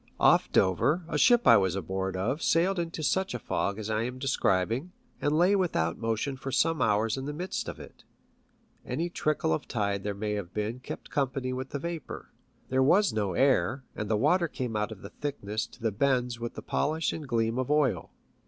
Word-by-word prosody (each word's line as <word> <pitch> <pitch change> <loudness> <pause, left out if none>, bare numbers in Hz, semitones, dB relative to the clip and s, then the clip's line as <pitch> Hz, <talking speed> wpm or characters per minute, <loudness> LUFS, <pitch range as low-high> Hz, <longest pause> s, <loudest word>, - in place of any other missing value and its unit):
Off - - +4
Dover 135 - +2
a 165 - -4
ship 240 - +5
I - - +8
was 95 -2 +1
aboard 95 -1 -3
of 120 - -1
sailed 180 +3 +2
into 165 -2 -3
such 190 -1 0
a - - 0
fog 100 -3 -2
as 110 -1 -5
I 110 0 0
am 125 +2 -3
describing, 130 - 0 0.3
and 145 +1 +1
lay 180 +4 +4
without 85 - 0
motion 115 +4 -1
for 135 +1 -5
some 160 +5 +2
hours 110 +3 +2
in 135 - -4
the 150 - -3
midst 180 +5 -3
of - - -8
it. - - -13 0.8
Any 165 +7 -3
trickle 150 - 0
of - - -3
tide 100 -3 -1
there 100 -1 -2
may 105 +1 -3
have 100 -4 -4
been 110 +3 -2
kept - - -8
company 135 -2 -1
with 130 +1 -4
the - - -3
vapour. 170 +2 -6 0.4
There 130 0 +2
was 190 +10 +4
no 105 -4 -1
air, 130 +1 +2
and 105 -1 -4
the 110 - +2
water 170 - +3
came 125 -6 -4
out 105 +2 -1
of 105 - -10
the - - -8
thickness 110 -7 -4
to - - -18
the 115 -1 0
bends 125 +1 0
with 120 0 -5
the - - -7
polish 160 +2 0
and 155 -3 -6
gleam 115 0 0
of 130 - -2
oil. 150 -4 +1
130 Hz, 210 wpm, -28 LUFS, 105-150 Hz, 0.8 s, I